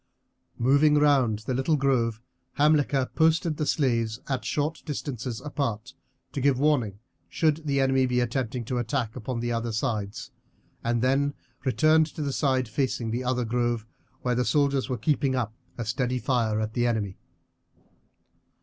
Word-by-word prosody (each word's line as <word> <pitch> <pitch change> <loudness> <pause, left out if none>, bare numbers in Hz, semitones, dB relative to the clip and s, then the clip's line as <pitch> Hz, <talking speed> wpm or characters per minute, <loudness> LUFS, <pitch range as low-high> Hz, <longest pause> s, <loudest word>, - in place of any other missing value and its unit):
Moving 140 +5 +4
round 135 -8 +3
the 130 - -1
little 135 +5 +1
grove 120 -5 +1 0.3
Hamilcar 145 -3 +3
posted 160 -1 +2
the 150 - -1
slaves 115 -5 +1
at 130 -2 -2
short 150 +2 -1
distances 130 -6 -4
apart, 130 -5 -3 0.4
to 140 - -3
give 140 -1 +3
warning 130 -9 +1 0.3
should 155 -1 0
the 140 -1 +1
enemy 135 -1 +3
be 125 0 +1
attempting 125 0 -2
an 125 - 0
attack 120 -2 -2
upon 125 -1 -4
the 120 0 -1
other 115 0 -1
sides, 110 +1 -3 0.5
and 120 0 0
then 140 +2 +2 0.3
returned 155 +5 +4
to 155 - -3
the 140 -1 -2
side 130 -4 +1
facing 120 -1 -1
the 120 +3 -2
other 125 -1 0
grove, 120 -1 0 0.4
where 125 - +1
the 125 +1 +1
soldiers 140 +3 +1
were 125 - -1
keeping 140 -1 +1
up 115 -4 -1 0.2
a 120 - -3
steady 125 +3 -1
fire 115 -4 0
at 110 0 -2
the 120 0 +1
enemy. 105 -5 -2
130 Hz, 160 wpm, -26 LUFS, 115-140 Hz, 0.5 s, Moving